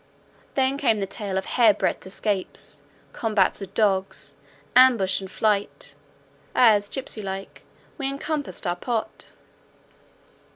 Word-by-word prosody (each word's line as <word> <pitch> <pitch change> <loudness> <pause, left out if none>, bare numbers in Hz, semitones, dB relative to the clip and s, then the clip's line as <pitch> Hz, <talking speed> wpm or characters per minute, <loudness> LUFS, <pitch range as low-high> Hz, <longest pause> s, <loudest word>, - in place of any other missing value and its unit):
Then 270 +1 +1
came 225 -7 +2
the 195 - -1
tale 195 -1 -4
of 190 - -2
hair 225 -5 +4
breadth 190 - -1
escapes, 195 0 -3 0.3
combats 210 -4 +1
with 195 0 -8
dogs, 195 -3 0 0.4
ambush 235 -8 +5
and 190 - -7
flight, 205 0 0 0.6
as 210 -4 +5
gipsey 260 -5 -2
like 195 0 -6 0.4
we 270 -1 0
encompassed 285 -2 -4
our 175 -1 0
pot. 235 -3 -3
210 Hz, 120 wpm, -24 LUFS, 195-250 Hz, 0.6 s, ambush